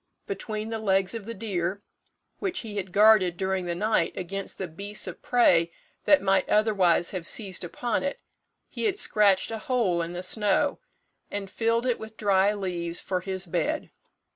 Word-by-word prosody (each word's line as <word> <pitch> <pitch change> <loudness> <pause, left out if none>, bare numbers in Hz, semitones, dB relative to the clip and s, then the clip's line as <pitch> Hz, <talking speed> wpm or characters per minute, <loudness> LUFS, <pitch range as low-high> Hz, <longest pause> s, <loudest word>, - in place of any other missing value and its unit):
Between 220 - -4
the 225 -1 -3
legs 195 -2 +1
of 225 -3 -6
the 230 - -4
deer, 195 -2 -3 0.6
which 375 -2 -2
he 215 -3 -7
had 190 -2 -4
guarded 205 -3 +5
during 190 -1 -1
the 170 - -2
night 210 -2 +1
against 195 +2 -4
the 190 - -4
beasts 200 +5 -5
of - - -8
prey 170 -9 +3 0.3
that 295 - +5
might 195 -1 +2
otherwise 195 -6 +3
have 180 -3 -4
seized 195 -5 -3
upon 225 +6 -2
it, 280 - -3 0.5
he - - -4
had 400 -3 +1
scratched 205 - +3
a 225 - -4
hole 215 -8 0
in 170 +1 -4
the 175 +1 -4
snow, 210 +8 +2 0.5
and 195 -2 -5
filled 230 +1 0
it 245 -2 0
with 220 0 -10
dry 200 -1 +3
leaves 175 -4 -3
for 185 -1 -2
his 190 0 -5
bed. 170 - -2
200 Hz, 175 wpm, -26 LUFS, 185-220 Hz, 0.6 s, guarded